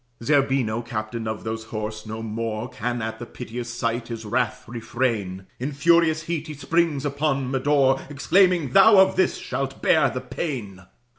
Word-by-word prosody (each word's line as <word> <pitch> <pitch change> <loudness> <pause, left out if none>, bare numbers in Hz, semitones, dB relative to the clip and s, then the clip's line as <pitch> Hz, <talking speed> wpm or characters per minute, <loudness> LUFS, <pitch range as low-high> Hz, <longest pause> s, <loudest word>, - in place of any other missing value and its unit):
Zerbino, 135 -5 +2
captain 115 0 -4
of 110 0 -4
those 110 0 -4
horse, 110 0 -5
no 110 +1 -5
more 110 +1 -3
Can 120 0 -3
at 110 0 -4
the 120 - -7
piteous 120 -1 -6
sight 115 0 -2
his 115 -2 -6
wrath 120 +1 -1
refrain; 115 -5 -2
In 130 +4 -3
furious 160 +1 +3
heat 165 -1 -3
he 155 - -6
springs, 155 -1 0
upon 140 -2 -1
Medore, 135 0 +2
Exclaiming, 170 0 +3
"Thou 205 - +7
of 190 0 +6
this 185 - +2
shalt 135 0 -4
bear 160 -2 +4
the 130 - -4
pain." 125 - -5
125 Hz, 160 wpm, -24 LUFS, 110-145 Hz, -, Thou